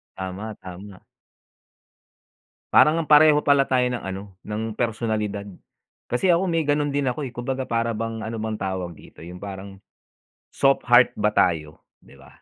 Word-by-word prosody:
Tama, 95 +3 -6
tama. 95 +1 -10 1.7
Parang 155 +2 +6
ngang 160 - -3
pareho 150 0 +7
pala 140 -2 +4
tayo 125 -2 +1
ng 125 -1 -4
ano, 95 0 -7
ng 110 +1 -4
personalidad. 110 -3 -2 0.6
Kasi 125 +10 +1
ako 175 +1 +2
may 165 -3 0
ganun 145 0 +1
din 140 -1 -1
ako 145 +4 -2
eh, 130 - -5
kumbaga 130 +2 -3
para 115 -2 -1
bang 115 0 -4
ano 115 +1 -5
bang 110 -1 -4
tawag 95 -2 -3
dito, - - -15
'yung 90 +1 -9
parang 95 -1 -8 0.7
soft 135 0 +2
heart 120 0 +5
ba 105 0 +1
tayo, 80 -6 0 0.2
‘di - - -20
ba? 70 0 -17
110 Hz, 160 wpm, -23 LUFS, 95-135 Hz, 1.7 s, pareho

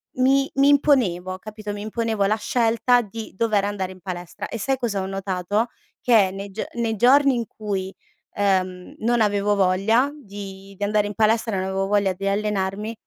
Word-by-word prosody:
mi 270 +2 +3
mi 275 +1 +4
imponevo, 200 - +2
capito? 215 +1 -7
Mi 205 0 -6
imponevo 220 -1 -1
la 210 +2 +2
scelta 235 +2 +2
di 220 0 -8
dover 215 -2 +1
andare 195 -2 -3
in 185 - -18
palestra, 180 +2 -6
e - - -4
sai 270 +5 0
cosa 225 -6 -2
ho - - -3
notato? 195 +3 -1 0.3
Che 215 -6 +4
nei 200 +1 -7
gio 210 - -4
nei 230 -2 -1
giorni 270 +3 +5
in 235 - -2
cui, 195 -3 -4 0.4
ehm, 185 -2 -1
non 235 +1 +1
avevo 205 -1 +2
voglia 200 +8 +2
di 195 -6 -10
di 205 - -4
andare 210 0 +1
in 205 - -5
palestra 220 0 +2
non 190 0 -1
avevo 195 0 -1
voglia 200 -2 +2
di 195 +2 -4
allenarmi, 205 +1 -1
205 Hz, 180 wpm, -23 LUFS, 195-230 Hz, 0.4 s, giorni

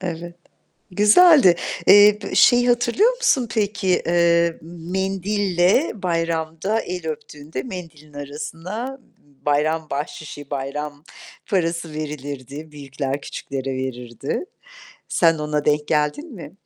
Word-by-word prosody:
Evet. 175 -1 -5 0.6
Güzeldi. 210 - +6 0.3
Eee, 205 +1 +7
p - - -6
şeyi 245 0 +5
hatırlıyor 245 - +3
musun 260 - +2
peki? 200 -3 0
Eee, 170 -1 +3
mendille 190 - 0
bayramda 165 +2 -1
el 180 -2 -6
öptüğünde 150 -2 -6
mendilin 155 -1 -9
arasına 165 - -6
b 145 - -31
b - - -30
bayram 155 +2 +1
bahşişi, 145 0 -6
bayram 145 +2 -5 0.4
parası 165 -4 -1
verilirdi, 145 0 -6
büyükler 140 -1 -4
küçüklere 135 -1 -5
verirdi. 125 - -4 0.6
Sen 165 -2 +3
ona 150 -1 -2
denk 150 0 +1
geldin 160 - -1
mi? 175 - -10
165 Hz, 110 wpm, -21 LUFS, 150-195 Hz, 0.6 s, Eee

